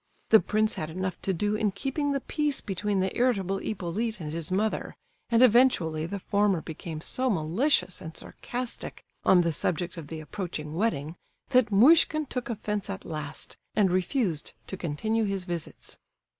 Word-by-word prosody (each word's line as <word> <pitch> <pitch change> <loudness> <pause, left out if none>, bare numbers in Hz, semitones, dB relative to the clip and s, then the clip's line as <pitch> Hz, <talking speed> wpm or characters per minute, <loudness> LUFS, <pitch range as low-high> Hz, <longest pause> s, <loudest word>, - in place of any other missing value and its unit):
The 220 - +8
prince 215 +4 +1
had 155 - -4
enough 185 +1 -4
to 195 - 0
do 205 +4 0
in 215 -1 +1
keeping 275 +7 -1
the 275 -1 0
peace 295 -1 0
between 195 0 -1
the 190 - -1
irritable 195 -6 +1
Hippolyte 215 +3 -3
and 155 -2 -5
his 165 -2 -4
mother, 210 +3 -1 0.3
and 230 +1 +5
eventually 205 -11 +4
the 200 - -4
former 200 -1 +2
became 160 0 -7
so 260 +9 0
malicious 185 - +1
and 160 0 -8
sarcastic 245 0 -6 0.2
on 180 -2 +6
the 170 -1 +1
subject 175 +4 -1
of 160 -3 -7
the 160 +1 -6
approaching 155 -2 -5
wedding, 165 -5 -1 0.3
that 250 -4 +4
Muishkin 310 +8 +6
took 250 -3 -4
offence 210 -3 -3
at 195 -1 -5
last, 155 -2 -5 0.2
and 200 -4 +4
refused 185 - 0
to - - -5
continue 215 +7 -1
his 195 -2 -2
visits. 170 -3 -6
195 Hz, 165 wpm, -28 LUFS, 170-225 Hz, 0.3 s, The